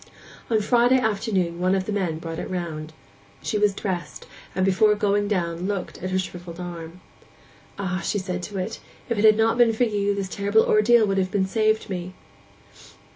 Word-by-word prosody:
On 225 -2 +3
Friday 245 +4 +4
afternoon 195 -6 -1
one 185 +1 +2
of 190 -1 -1
the 215 - -3
men 185 -6 -1
brought 165 0 -6
it - - -5
round. 160 -4 -4 0.5
She 210 - -1
was 205 -1 +2
dressed, 180 -7 -4 0.3
and 185 0 +2
before 210 +2 +4
going 205 0 +1
down 175 -3 -1
looked 200 -3 -4
at 185 - -3
her 185 - 0
shrivelled 180 -2 -6
arm. 175 0 -7 0.8
'Ah!' 190 -1 -2
she 210 - -1
said 185 -2 -3
to 195 +3 -6
it, 205 +5 -4 0.3
'if 235 -3 0
it - - +1
had 215 -1 +7
not 225 +2 +2
been 235 -2 +5
for 220 - +1
you 205 -3 0
this 200 -1 -3
terrible 200 +3 +2
ordeal 220 +2 +5
would 195 -1 0
have 185 -1 0
been 190 0 +1
saved 215 +2 +1
me! 185 -1 -5
195 Hz, 190 wpm, -24 LUFS, 180-215 Hz, 0.8 s, had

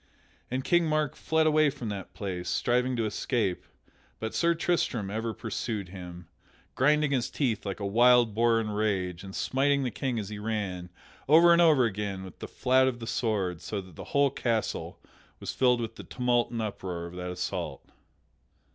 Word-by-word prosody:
And 130 +1 -2
King 175 +1 +3
Mark 155 -3 0
fled 160 0 +1
away 155 -1 +4
from 120 -4 -6
that 100 -2 -6
place, 95 -5 -4
striving 125 +6 +1
to 115 -2 0
escape, 105 -2 -1 0.5
but 110 0 -4
Sir 170 0 +2
Tristram 155 - 0
ever 110 +2 -2
pursued 110 -3 -4
him, 90 -2 -9 0.5
grinding 150 +2 +3
his 125 -4 0
teeth 115 -8 -1
like 100 - -4
a 100 - -3
wild 120 +2 +5
boar 115 +1 +3
in 110 -1 -2
rage, 95 -4 -1
and 95 -1 -9
smiting 140 +1 +1
the 125 - -1
King 120 +3 -2
as 105 -3 -4
he 105 -1 -6
ran, 100 -5 -3 0.4
over 170 +3 +8
and 170 - +5
over 155 -7 +5
again, 100 -3 -3
with 95 -3 -11
the - - -6
flat 130 +1 +3
of 130 -2 -1
the 115 - -7
sword 100 -8 -1
so 105 - -4
that 95 -4 -11
the - - -8
whole 140 -1 +2
castle 115 -5 -2 0.4
was - - -5
filled 125 -2 +3
with 115 -2 -5
the - - -8
tumult 125 -1 0
and 115 -1 -3
uproar 90 -5 -4
of 85 - -9
that 90 0 -5
assault. 90 0 -4
115 Hz, 185 wpm, -28 LUFS, 100-130 Hz, 0.5 s, over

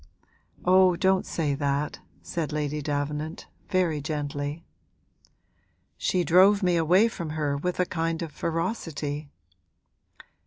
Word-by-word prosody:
'Oh, 185 0 +5
don't 190 +2 +2
say 150 -4 -1
that,' 140 +1 -1 0.2
said 160 -4 -3
Lady 150 0 -2
Davenant, 150 +2 -3 0.2
very 175 -5 +1
gently. 145 +1 -3 1.3
'She 180 -1 0
drove 190 +4 +5
me 180 -1 +3
away 175 +7 +4
from 170 -8 -5
her 145 -2 0
with 180 +6 -2
a 180 - +3
kind 165 -1 -2
of 165 - -6
ferocity.' 160 -5 -3
160 Hz, 115 wpm, -26 LUFS, 145-180 Hz, 1.3 s, Oh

